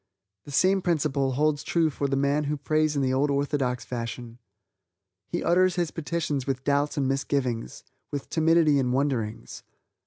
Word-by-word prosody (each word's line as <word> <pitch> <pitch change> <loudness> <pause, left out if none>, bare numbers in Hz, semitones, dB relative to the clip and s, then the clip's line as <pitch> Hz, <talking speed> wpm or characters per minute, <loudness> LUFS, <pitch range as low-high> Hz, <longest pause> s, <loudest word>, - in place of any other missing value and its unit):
The 145 - -9
same 190 +7 +3
principle 145 -6 0
holds 145 +2 +1
true 165 -1 +1
for 140 0 -2
the 135 - 0
man 140 +2 +1
who 150 +1 -1
prays 155 +1 +1
in 140 - +1
the 130 0 +1
old 140 +3 +2
orthodox 140 -3 -1
fashion. 120 0 -6 0.9
He 175 - -3
utters 185 +1 +3
his 175 -3 -1
petitions 155 -4 -3
with 130 -1 -2
doubts 145 +1 0
and 135 -2 +1
misgivings, 135 -3 -2 0.3
with 145 -2 -5
timidity 160 -2 +3
and 125 -2 0
wonderings. 125 -6 -2
145 Hz, 160 wpm, -26 LUFS, 135-155 Hz, 0.9 s, same